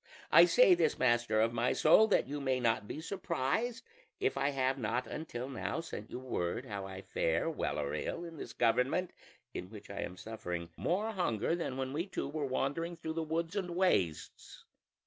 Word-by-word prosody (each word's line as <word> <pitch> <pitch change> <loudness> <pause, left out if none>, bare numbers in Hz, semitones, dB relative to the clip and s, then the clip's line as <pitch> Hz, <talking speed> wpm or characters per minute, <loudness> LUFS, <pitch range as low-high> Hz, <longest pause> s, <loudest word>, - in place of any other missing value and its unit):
I - - +9
say - - +6
this, 350 - +2
master 120 -3 +2
of 115 +1 +3
my 120 +1 +1
soul, 215 +8 +6
that - - +3
you 145 +1 -4
may 130 -2 +1
not 115 -3 +1
be 155 - -5
surprised 190 - -1 0.4
if 410 0 +1
I 140 - +1
have 135 -1 0
not 125 +2 -1
until 125 -1 -5
now 135 - -3
sent 135 -10 -7
you - - -5
word 125 -3 -2
of 120 - -11
how 100 -1 -4
I 95 0 -8
fare, 80 - 0
well 155 - -2
or 75 -1 -2
ill, 170 - -3
in 165 -1 -9
this - - -7
government, 125 +9 +2 0.4
in 90 - -5
which 105 -2 -10
I 100 - -6
am 90 - -5
suffering 90 -5 -5
more 205 +6 0
hunger 170 - 0
than 150 -7 -3
when 130 0 -3
we 165 +6 -2
two 190 - -3
were 145 0 -2
wandering 155 +6 -1
through 160 -1 -4
the 165 - -2
woods 165 +3 -2
and 180 -4 -2
wastes. 95 - 0
135 Hz, 200 wpm, -33 LUFS, 115-165 Hz, 0.4 s, I